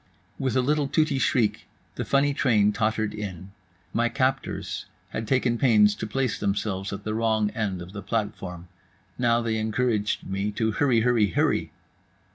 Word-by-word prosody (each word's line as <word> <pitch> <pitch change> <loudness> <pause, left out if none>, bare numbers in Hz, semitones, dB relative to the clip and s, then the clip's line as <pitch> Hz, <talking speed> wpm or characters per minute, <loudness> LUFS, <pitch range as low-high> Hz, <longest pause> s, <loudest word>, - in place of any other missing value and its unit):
With 130 -3 -1
a 130 - +4
little 145 +1 +1
tooty 150 -1 +1
shriek 125 -6 +1 0.3
the - - -3
funny 140 +1 +2
train 110 -7 +3
tottered 110 -1 0
in. 95 -3 -6 0.4
My 120 +1 +2
captors 130 +2 -2 0.2
had 110 - -4
taken 125 -2 +1
pains 105 -5 +5
to - - -5
place 130 +2 -1
themselves 100 -1 -1
at 100 0 -6
the 110 - -2
wrong 110 -2 +1
end 95 -5 -2
of 90 +2 -12
the 100 - -6
platform. 95 -6 -4 0.5
Now 120 -1 +3
they 110 -1 0
encouraged 110 -1 0
me 100 +2 -2
to 110 +1 0
HurryHurryHurry. 115 - +2
110 Hz, 150 wpm, -26 LUFS, 105-125 Hz, 0.5 s, pains